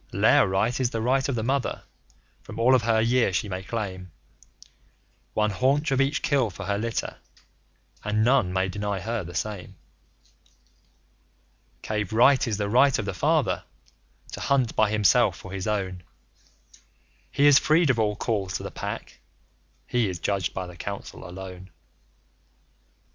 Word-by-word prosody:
Lair -, -, +4 dB
Right 100 Hz, +7 st, 0 dB
is 130 Hz, -2 st, +1 dB
the 115 Hz, -, -3 dB
right 130 Hz, +4 st, +1 dB
of 135 Hz, -, -1 dB
the 110 Hz, -, -2 dB
Mother. 135 Hz, +2 st, -1 dB, 0.6 s
From -, -, -10 dB
all 125 Hz, +3 st, +5 dB
of 130 Hz, -, +5 dB
her 115 Hz, -1 st, +2 dB
year 115 Hz, -1 st, +2 dB
she 95 Hz, +4 st, -1 dB
may 95 Hz, -1 st, -4 dB
claim 95 Hz, -4 st, -5 dB, 1.2 s
One 105 Hz, 0 st, +2 dB
haunch 135 Hz, +8 st, +1 dB
of 135 Hz, 0 st, +2 dB
each 135 Hz, +3 st, 0 dB
kill 135 Hz, -6 st, +2 dB
for 90 Hz, -, -8 dB
her 100 Hz, 0 st, -1 dB
litter, 115 Hz, +1 st, -3 dB, 0.9 s
and 105 Hz, +1 st, +1 dB
none 120 Hz, -6 st, +3 dB
may 95 Hz, +1 st, 0 dB
deny 100 Hz, +1 st, -3 dB
her 110 Hz, +2 st, -3 dB
the 85 Hz, 0 st, -9 dB
same. 100 Hz, +2 st, -4 dB, 2.1 s
Cave 105 Hz, -3 st, -2 dB
Right 125 Hz, +4 st, +4 dB
is 110 Hz, -3 st, -1 dB
the 105 Hz, -1 st, -1 dB
right 130 Hz, +5 st, +4 dB
of -, -, -3 dB
the -, -, -3 dB
Father -, -, +1 dB, 0.7 s
to -, -, -7 dB
hunt 130 Hz, -4 st, +1 dB
by 110 Hz, -1 st, +3 dB
himself 105 Hz, -3 st, +3 dB
for 95 Hz, -, -11 dB
his 95 Hz, 0 st, -4 dB
own. 95 Hz, -4 st, -2 dB, 1.3 s
He 145 Hz, -, +2 dB
is 145 Hz, -1 st, +8 dB
freed 155 Hz, -1 st, +3 dB
of 120 Hz, -, -2 dB
all 105 Hz, -1 st, +1 dB
calls 100 Hz, -5 st, -2 dB
to -, -, -9 dB
the -, -, -6 dB
Pack; -, -, -6 dB, 0.7 s
he 120 Hz, -4 st, 0 dB
is 90 Hz, -, -4 dB
judged 95 Hz, -1 st, -1 dB
by 95 Hz, -, -4 dB
the 90 Hz, -1 st, -11 dB
Council 100 Hz, -2 st, -7 dB
alone. 95 Hz, 0 st, -9 dB
105 Hz, 160 wpm, -25 LUFS, 95-125 Hz, 2.1 s, is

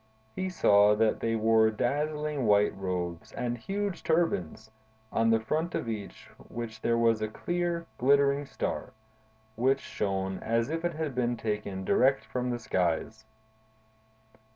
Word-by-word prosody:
He 185 Hz, 0 st, -2 dB
saw 105 Hz, -, +5 dB
that 110 Hz, 0 st, +2 dB
they 115 Hz, 0 st, 0 dB
wore 110 Hz, 0 st, +4 dB
dazzling 150 Hz, +3 st, -1 dB
white 105 Hz, 0 st, +4 dB
robes 90 Hz, -3 st, -4 dB
and 120 Hz, -1 st, -2 dB
huge 195 Hz, -, -3 dB
turbans, 160 Hz, -, 0 dB, 0.4 s
on 115 Hz, 0 st, +2 dB
the 115 Hz, 0 st, +4 dB
front 155 Hz, +10 st, -2 dB
of -, -, -2 dB
each 105 Hz, -3 st, -6 dB
of -, -, -17 dB
which 110 Hz, -2 st, -6 dB
there 115 Hz, 0 st, +2 dB
was 115 Hz, -2 st, +3 dB
a 110 Hz, -, 0 dB
clear, 175 Hz, +7 st, -2 dB
glittering 140 Hz, +2 st, +3 dB
star, -, -, -4 dB, 0.6 s
which 130 Hz, +4 st, +2 dB
shone 95 Hz, -4 st, -3 dB
as 115 Hz, +4 st, 0 dB
if 165 Hz, +1 st, -2 dB
it 175 Hz, 0 st, 0 dB
had 155 Hz, -3 st, -3 dB
been 120 Hz, -1 st, 0 dB
taken 105 Hz, -4 st, -3 dB
direct 135 Hz, +6 st, +3 dB
from 125 Hz, 0 st, -3 dB
the 120 Hz, -, -1 dB
skies. 110 Hz, +1 st, -1 dB
115 Hz, 150 wpm, -29 LUFS, 105-145 Hz, 0.6 s, saw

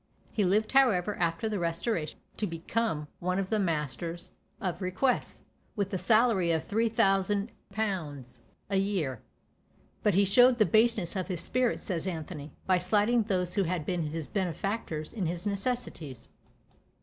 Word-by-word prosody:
He 215 Hz, -, +1 dB
lived 205 Hz, +4 st, +2 dB
however 215 Hz, -8 st, +4 dB
after 170 Hz, +4 st, 0 dB
the 210 Hz, -2 st, -1 dB
Restoration 170 Hz, 0 st, -2 dB, 0.2 s
to 210 Hz, -, -1 dB
become 165 Hz, -1 st, -2 dB
one 185 Hz, +1 st, -1 dB
of 195 Hz, +1 st, -2 dB
the 215 Hz, -, +2 dB
masters 165 Hz, 0 st, -2 dB, 0.3 s
of 180 Hz, -2 st, -3 dB
requests, 185 Hz, +8 st, 0 dB, 0.3 s
with 200 Hz, -1 st, -2 dB
a 190 Hz, -, 0 dB
salary 220 Hz, -5 st, +4 dB
of 160 Hz, -1 st, -1 dB
3000_l._ 200 Hz, -, 0 dB, 0.3 s
a 195 Hz, -, +3 dB
year. 185 Hz, -, -1 dB, 0.8 s
But 210 Hz, -4 st, +2 dB
he 200 Hz, +1 st, +5 dB
showed 245 Hz, +6 st, +6 dB
the 215 Hz, -, +5 dB
baseness 220 Hz, -5 st, +2 dB
of 185 Hz, -2 st, -2 dB
his 180 Hz, -4 st, -2 dB
spirit, 255 Hz, -1 st, 0 dB
says 180 Hz, -3 st, -2 dB
Anthony, 160 Hz, -4 st, -5 dB
by 185 Hz, -1 st, +3 dB
slighting 210 Hz, +6 st, +3 dB
those 185 Hz, -4 st, 0 dB
who 200 Hz, -2 st, +2 dB
had 170 Hz, -2 st, -2 dB
been 180 Hz, 0 st, -1 dB
his 155 Hz, 0 st, -3 dB
benefactors 185 Hz, -3 st, -3 dB
in 195 Hz, -7 st, -1 dB
his 175 Hz, +3 st, -4 dB
necessities. 200 Hz, -, -3 dB
190 Hz, 150 wpm, -29 LUFS, 170-215 Hz, 0.8 s, showed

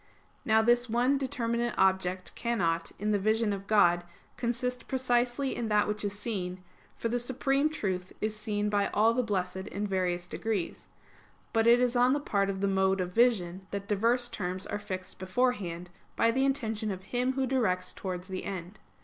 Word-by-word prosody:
Now 220 Hz, -3 st, +4 dB
this 240 Hz, +1 st, +3 dB
one 250 Hz, +5 st, +2 dB
determinate 235 Hz, -3 st, -1 dB
object 190 Hz, -1 st, +1 dB
cannot, 170 Hz, -9 st, -1 dB
in 210 Hz, +3 st, -1 dB
the 205 Hz, -, +2 dB
vision 215 Hz, +1 st, +1 dB
of 195 Hz, 0 st, -6 dB
God, 175 Hz, -5 st, +4 dB, 0.3 s
consist 250 Hz, +1 st, -2 dB
precisely 255 Hz, +1 st, 0 dB
in 235 Hz, -, -2 dB
that 210 Hz, -1 st, +3 dB
which 210 Hz, 0 st, -1 dB
is 205 Hz, 0 st, -1 dB
seen; 185 Hz, -4 st, -3 dB, 0.3 s
for -, -, -1 dB
the 240 Hz, +1 st, 0 dB
Supreme 270 Hz, +4 st, +1 dB
Truth 190 Hz, -, -3 dB
is 215 Hz, 0 st, -2 dB
seen 210 Hz, -1 st, -2 dB
by 205 Hz, -1 st, +2 dB
all 220 Hz, +2 st, +5 dB
the 250 Hz, -, +2 dB
blessed 190 Hz, -3 st, -2 dB
in 205 Hz, 0 st, -3 dB
various 180 Hz, -3 st, -1 dB
degrees: 205 Hz, -2 st, -3 dB, 0.7 s
but 225 Hz, 0 st, +3 dB
it 240 Hz, +1 st, +7 dB
is 250 Hz, 0 st, +1 dB
on 245 Hz, +1 st, +4 dB
the 290 Hz, -, +1 dB
part 200 Hz, -8 st, 0 dB
of 190 Hz, -1 st, -3 dB
the 200 Hz, -, +2 dB
mode 190 Hz, 0 st, +2 dB
of 180 Hz, -1 st, -2 dB
vision, 190 Hz, -6 st, +2 dB
that 200 Hz, 0 st, -5 dB
diverse 230 Hz, +4 st, +2 dB
terms 190 Hz, -4 st, -2 dB
are 205 Hz, -, -3 dB
fixed 185 Hz, -3 st, -6 dB
beforehand 185 Hz, -4 st, -1 dB, 0.2 s
by 230 Hz, -, +3 dB
the 265 Hz, +3 st, +2 dB
intention 225 Hz, -6 st, -1 dB
of 190 Hz, -2 st, -5 dB
Him 250 Hz, +5 st, 0 dB
Who 265 Hz, 0 st, 0 dB
directs 215 Hz, -9 st, 0 dB
towards 185 Hz, -1 st, -5 dB
the 190 Hz, -1 st, -5 dB
end. 185 Hz, +1 st, -6 dB
210 Hz, 185 wpm, -29 LUFS, 190-240 Hz, 0.7 s, it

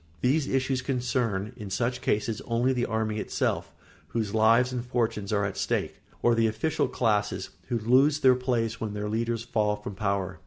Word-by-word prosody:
These 140 Hz, +3 st, +2 dB
issues 130 Hz, 0 st, 0 dB
concern, 125 Hz, -5 st, -1 dB
in 105 Hz, -5 st, -8 dB
such 120 Hz, +5 st, -1 dB
cases, 110 Hz, +3 st, 0 dB
only 120 Hz, +2 st, +1 dB
the 120 Hz, -1 st, 0 dB
army 110 Hz, -1 st, -1 dB
itself, -, -, -2 dB, 0.3 s
whose 110 Hz, -4 st, -2 dB
lives 115 Hz, +3 st, +4 dB
and 125 Hz, -1 st, -2 dB
fortunes 115 Hz, -5 st, -1 dB
are 100 Hz, -1 st, +2 dB
at 100 Hz, -1 st, -3 dB
stake, -, -, -2 dB, 0.2 s
or 120 Hz, -, +5 dB
the 115 Hz, -1 st, +3 dB
official 110 Hz, +9 st, 0 dB
classes, 105 Hz, -5 st, 0 dB, 0.2 s
who 120 Hz, -, 0 dB
lose 135 Hz, +7 st, +3 dB
their 130 Hz, -1 st, +7 dB
places 120 Hz, -3 st, -1 dB
when 105 Hz, -2 st, -3 dB
their 105 Hz, 0 st, -3 dB
leaders 115 Hz, +1 st, -1 dB
fall 105 Hz, -3 st, 0 dB
from 105 Hz, -1 st, -7 dB
power. 95 Hz, -2 st, -2 dB
115 Hz, 180 wpm, -27 LUFS, 105-125 Hz, 0.3 s, their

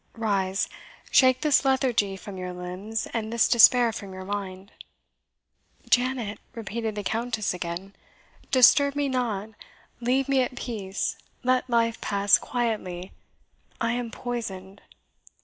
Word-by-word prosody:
Rise, 195 Hz, -3 st, 0 dB, 0.4 s
shake 255 Hz, -1 st, +5 dB
this 295 Hz, -3 st, +3 dB
lethargy 245 Hz, -7 st, +1 dB
from 200 Hz, 0 st, -9 dB
your 180 Hz, -1 st, -5 dB
limbs, 185 Hz, +5 st, -5 dB
and 220 Hz, -1 st, -2 dB
this 235 Hz, -1 st, +3 dB
despair 240 Hz, 0 st, +6 dB
from 200 Hz, -3 st, -7 dB
your 185 Hz, 0 st, -8 dB
mind." 195 Hz, -1 st, -5 dB, 1.2 s
"Janet," 245 Hz, -4 st, +1 dB, 0.2 s
repeated 225 Hz, -1 st, -4 dB
the 205 Hz, -, -4 dB
Countess 220 Hz, -1 st, -1 dB
again, 180 Hz, +2 st, -6 dB, 0.5 s
"disturb 280 Hz, +2 st, +5 dB
me 290 Hz, -1 st, 0 dB
not 225 Hz, -5 st, -2 dB, 0.5 s
leave 255 Hz, +3 st, +1 dB
me 270 Hz, -1 st, +3 dB
at 250 Hz, 0 st, -2 dB
peace 200 Hz, -7 st, -4 dB, 0.2 s
let 255 Hz, 0 st, +1 dB
life 230 Hz, -1 st, +1 dB
pass 200 Hz, 0 st, +3 dB
quietly. 210 Hz, -7 st, -3 dB, 0.7 s
I 230 Hz, -1 st, 0 dB
am 240 Hz, -1 st, -2 dB
poisoned." 200 Hz, -6 st, -6 dB
225 Hz, 125 wpm, -26 LUFS, 195-245 Hz, 1.2 s, despair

